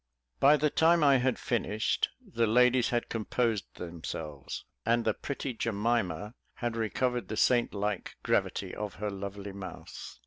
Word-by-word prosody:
By 145 +2 +7
the 150 0 +2
time 165 0 +4
I 140 -2 +6
had 125 -1 +1
finished, 110 -5 0 0.2
the 120 - 0
ladies 125 +2 +4
had 120 -1 0
composed 115 -1 -1
themselves; 80 -4 -6 0.2
and 115 0 +2
the 110 - +3
pretty 140 +1 -4
Jemima 110 -4 -1 0.2
had 120 -2 -2
recovered 120 +2 0
the 110 - -4
saint 120 -2 +3
like 100 -1 -2
gravity - - 0
of 105 -2 -5
her 105 +2 -3
lovely 100 +1 -6
mouth. 95 -3 -8
115 Hz, 145 wpm, -30 LUFS, 100-125 Hz, 0.2 s, By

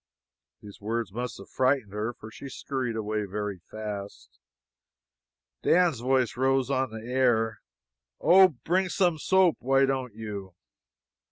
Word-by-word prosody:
These 105 -1 -12
words 115 0 -2
must 125 +2 -4
have - - -11
frightened 130 -6 +1
her, 105 +3 -2
for 110 -2 -12
she 135 +5 -9
skurried 130 -3 -3
away 105 -1 -2
very 100 -1 -4
fast. 100 - -7 1.2
Dan's 170 -7 +3
voice 130 -1 +1
rose 135 +1 +1
on 130 -1 +1
the 110 0 -8
air: 120 -3 +1 0.6
"Oh, 190 +2 +7
bring 180 +6 -1
some 175 -4 +1
soap, 185 0 +3
why 135 +1 +3
don't 130 -4 -2
you!" 100 -4 -7
120 Hz, 135 wpm, -27 LUFS, 105-135 Hz, 1.2 s, Oh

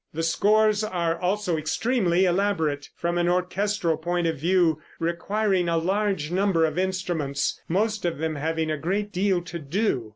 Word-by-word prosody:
The 165 - -1
scores 215 +5 +3
are 175 -5 -1
also 185 -2 0
extremely 185 +2 +1
elaborate, 175 -6 0
from 175 +1 -1
an 175 0 +2
orchestral 180 -1 0
point 175 +2 -1
of 165 -1 +1
view, 165 0 +2 0.2
requiring 180 +2 0
a 165 - +1
large 190 -2 0
number 185 -3 +2
of 155 +2 -2
instruments, 175 -7 -1
most 210 +4 0
of 170 -3 -1
them 160 +1 -2
having 160 +1 -1
a 155 - -1
great 200 +6 -2
deal 185 -2 +1
to 175 -1 -6
do. 145 - -1
175 Hz, 160 wpm, -25 LUFS, 160-200 Hz, 0.2 s, scores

